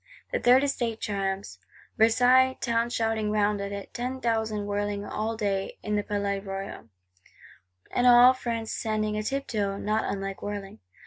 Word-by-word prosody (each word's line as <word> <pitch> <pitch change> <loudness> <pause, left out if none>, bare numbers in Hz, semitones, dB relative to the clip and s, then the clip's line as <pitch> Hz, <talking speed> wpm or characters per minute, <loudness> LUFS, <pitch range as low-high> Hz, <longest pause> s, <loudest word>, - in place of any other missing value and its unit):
The - - 0
Third 255 +2 +5
Estate 240 -5 -1
triumphs; 195 -1 -3 0.4
Versailles 250 +3 +4
Town 235 0 0
shouting 225 -2 0
round 210 -1 +1
it; 200 0 -6
ten 250 +2 -3
thousand 220 -3 -1
whirling 205 0 -2
all 220 +2 -3
day 195 -3 -2
in 210 0 -1
the 205 - +1
Palais 200 -1 -2
Royal; 195 - -7 1.0
and 245 - +2
all 245 +1 +8
France 230 -3 -4
standing 215 -1 -1
a 215 - -1
tiptoe, 215 -5 -2
not 215 +2 -1
unlike 195 -1 -4
whirling! 200 - -6
215 Hz, 145 wpm, -27 LUFS, 200-235 Hz, 1.0 s, all